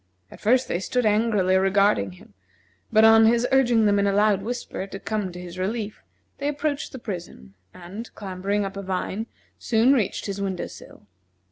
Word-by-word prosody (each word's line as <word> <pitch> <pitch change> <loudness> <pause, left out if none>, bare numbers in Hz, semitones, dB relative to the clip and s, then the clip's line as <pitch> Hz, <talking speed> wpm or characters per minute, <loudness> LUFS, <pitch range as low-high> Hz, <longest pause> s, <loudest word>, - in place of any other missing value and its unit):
At - - -13
first 250 +4 +3
they 175 - -1
stood 245 +5 -1
angrily 210 -3 +2
regarding 190 - +2
him; 90 - -18 0.6
but 220 +1 +6
on 225 0 +7
his 235 +1 +3
urging 240 -4 +4
them 205 -1 +3
in 200 - +2
a 200 - +1
loud 205 -1 +3
whisper 235 -3 -5
to 195 - -8
come 210 -4 -3
to 175 - -9
his 180 0 -9
relief, 210 +2 -3 0.4
they 285 - -2
approached 290 0 -2
the 265 - -7
prison 175 - -8 0.2
and, 190 +7 -9
clambering 200 +1 -2
up 195 0 -6
a 200 - -4
vine, 190 +3 -3 0.3
soon 230 +3 +3
reached 225 -8 0
his 200 -1 -4
window 190 -2 -2
sill. - - -13
205 Hz, 180 wpm, -24 LUFS, 190-230 Hz, 0.6 s, on